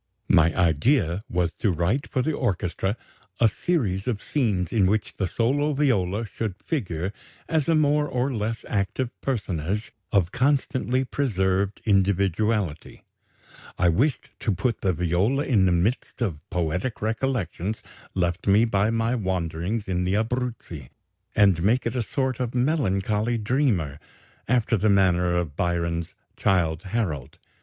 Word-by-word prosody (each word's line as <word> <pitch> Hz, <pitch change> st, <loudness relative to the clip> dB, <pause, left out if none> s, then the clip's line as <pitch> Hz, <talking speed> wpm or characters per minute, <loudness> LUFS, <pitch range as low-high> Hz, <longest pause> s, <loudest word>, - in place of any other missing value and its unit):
My 80 Hz, -3 st, +5 dB
idea 90 Hz, -, +2 dB
was 85 Hz, -1 st, 0 dB
to 105 Hz, -, +2 dB
write 90 Hz, -, 0 dB
for 130 Hz, -, -1 dB
the 155 Hz, -, 0 dB
orchestra 95 Hz, -3 st, -1 dB, 0.4 s
a 115 Hz, -, +6 dB
series 105 Hz, -, -1 dB
of 115 Hz, -5 st, -2 dB
scenes 105 Hz, -, 0 dB
in 100 Hz, -5 st, +4 dB
which 105 Hz, +2 st, 0 dB
the 95 Hz, -, 0 dB
solo 140 Hz, -, +1 dB
viola 115 Hz, -7 st, +1 dB
should 110 Hz, -2 st, -4 dB
figure 95 Hz, -, -3 dB, 0.3 s
as 160 Hz, -1 st, 0 dB
a 165 Hz, -, +4 dB
more 150 Hz, -1 st, +3 dB
or 130 Hz, +1 st, -1 dB
less 115 Hz, 0 st, -3 dB
active 110 Hz, +5 st, -1 dB
personage 100 Hz, -, -2 dB, 0.2 s
of 95 Hz, -4 st, +2 dB
constantly 130 Hz, -1 st, +1 dB
preserved 100 Hz, -7 st, 0 dB
individuality; 100 Hz, -3 st, +1 dB, 0.7 s
I 90 Hz, 0 st, +3 dB
wished 125 Hz, -, 0 dB
to 110 Hz, -, 0 dB
put 115 Hz, +4 st, -1 dB
the 95 Hz, -, +2 dB
viola 90 Hz, -, +1 dB
in 100 Hz, -8 st, +3 dB
the -, -, +3 dB
midst 90 Hz, +9 st, 0 dB
of 95 Hz, -, -1 dB
poetic 90 Hz, +7 st, -2 dB
recollections 110 Hz, -4 st, -2 dB, 0.3 s
left 90 Hz, 0 st, -1 dB
me 105 Hz, +4 st, +5 dB
by 100 Hz, -2 st, +1 dB
my 115 Hz, +1 st, 0 dB
wanderings 95 Hz, 0 st, -2 dB
in 90 Hz, -1 st, 0 dB
the 95 Hz, +2 st, 0 dB
Abruzzi, 110 Hz, -, -3 dB, 0.5 s
and 100 Hz, -5 st, +4 dB
make 115 Hz, +8 st, +2 dB
it 115 Hz, +2 st, -2 dB
a 125 Hz, -, +1 dB
sort 130 Hz, +2 st, -2 dB
of 125 Hz, -1 st, -2 dB
melancholy 115 Hz, -, +1 dB
dreamer, 105 Hz, -, 0 dB, 0.5 s
after 120 Hz, -1 st, +2 dB
the 105 Hz, +3 st, +2 dB
manner 90 Hz, -3 st, +3 dB
of 80 Hz, -5 st, -2 dB
Byron's 85 Hz, -1 st, -1 dB, 0.2 s
'Childe 80 Hz, -4 st, +1 dB
Harold.' 95 Hz, -, -3 dB
105 Hz, 140 wpm, -25 LUFS, 90-125 Hz, 0.7 s, a